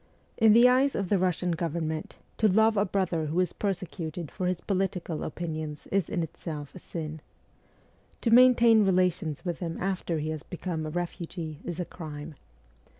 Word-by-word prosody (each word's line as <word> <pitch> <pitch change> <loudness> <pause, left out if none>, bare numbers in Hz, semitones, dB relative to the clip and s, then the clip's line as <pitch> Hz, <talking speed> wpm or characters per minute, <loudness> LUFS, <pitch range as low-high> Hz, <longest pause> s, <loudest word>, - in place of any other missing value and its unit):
In 220 -2 +6
the 235 +2 +8
eyes 260 +2 +3
of 195 -3 -2
the 200 - +3
Russian 180 -1 +1
govern 165 -1 -2
ment, 155 0 -5 0.2
to 220 - +5
love 220 +3 +4
a 205 0 +3
brother 180 -5 0
who 160 +4 0
is 185 - +1
persecuted 175 -5 -4
for 180 - -2
his 180 -1 0
poli 195 0 +1
tical 170 -4 -5
opinions 155 -2 -5
is 195 -4 +1
in 175 -5 -1
itself 150 -2 -7
a - - -9
sin. 155 -3 -6 1.0
To 230 - +1
maintain 235 -2 +7
relations 180 -5 +1
with 175 -2 -2
him 165 -2 -4
after 185 -3 -1
he 155 0 -2
has 155 -1 -4
become 165 -2 -4
a - - -3
refugee 170 -2 -5
is 175 0 -5
a 180 - -1
crime. 155 -2 -8
175 Hz, 180 wpm, -28 LUFS, 160-195 Hz, 1.0 s, the